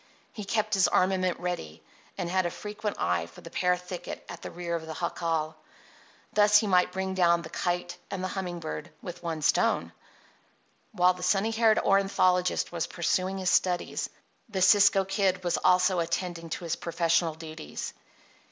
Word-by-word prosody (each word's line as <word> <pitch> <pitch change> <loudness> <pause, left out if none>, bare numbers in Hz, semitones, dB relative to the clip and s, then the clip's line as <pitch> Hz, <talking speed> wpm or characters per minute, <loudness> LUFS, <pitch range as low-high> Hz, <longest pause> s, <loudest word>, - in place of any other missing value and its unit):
He 210 - -6
kept 215 +1 0
his 195 -3 +4
armament 185 -1 +1
ready, 85 - -5 0.3
and 180 -3 -2
had 185 0 +1
a - - -2
frequent 210 +2 -5
eye 85 -1 0
for 85 - -15
the 165 - -11
pear 180 0 +2
thicket 180 0 -7
at 170 - -9
the - - -6
rear 175 0 -5
of 160 -1 -5
the 160 - -6
jacal. 165 -2 -2 0.8
Thus 210 0 +6
he 215 - +2
might 180 -2 +3
bring 190 +1 -3
down 170 -2 +3
the 160 - -9
kite 175 0 -2
and 185 -1 -4
the 185 - -1
humming 180 -3 -4
bird 165 +1 -6
with 175 -1 -7
one 165 -3 -4
stone. - - +2 1.0
While 180 -4 +4
the 180 - -11
sunny 195 +4 +2
haired 225 -1 +4
ornithologist 185 -2 +2
was 170 -2 -2
pursuing 185 +2 -1
his 185 -2 0
studies 180 -1 +1 0.4
the 190 -3 0
Cisco 195 0 +6
Kid 190 -1 0
was 175 - +1
also 180 0 +3
attending 170 0 -3
to 170 - -4
his 170 0 -2
professional 165 -1 +1
duties. 155 - -7
180 Hz, 170 wpm, -28 LUFS, 170-190 Hz, 1.0 s, Thus